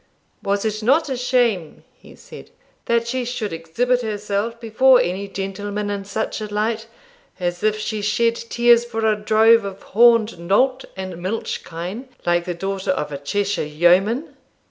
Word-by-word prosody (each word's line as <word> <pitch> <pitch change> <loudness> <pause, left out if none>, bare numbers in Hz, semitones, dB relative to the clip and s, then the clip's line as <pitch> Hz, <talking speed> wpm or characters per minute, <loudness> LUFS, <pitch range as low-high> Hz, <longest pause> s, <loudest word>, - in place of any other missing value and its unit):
'Was 200 0 -1
it 215 0 -2
not 275 +8 +2
a 265 - -1
shame,' 240 -9 0
he - - -17
said, - - -13 0.4
'that 235 0 +1
she 255 +1 -1
should 230 -5 -4
exhibit 235 +11 0
herself 210 +1 -3
before 245 +3 +4
any 190 +3 -2
gentleman 205 +1 -4
in 200 -1 -3
such 220 +2 -3
a 210 -1 -6
light, 220 +2 -1 0.5
as 175 -1 -2
if 215 0 +1
she 215 0 -3
shed 230 +3 +2
tears 235 0 +3
for 225 -2 -3
a 215 -1 +3
drove 220 +2 +4
of 195 -1 -7
horned 230 -3 +4
nolt 255 +10 +1
and 185 -2 -6
milch 195 +5 -3
kine, 185 +10 -7 0.2
like 175 0 +1
the 180 -1 -3
daughter 195 +2 -4
of 150 -5 -1
a 140 - -4
Cheshire 200 +7 -1
yeoman! 180 - +2
210 Hz, 165 wpm, -21 LUFS, 190-230 Hz, 0.5 s, before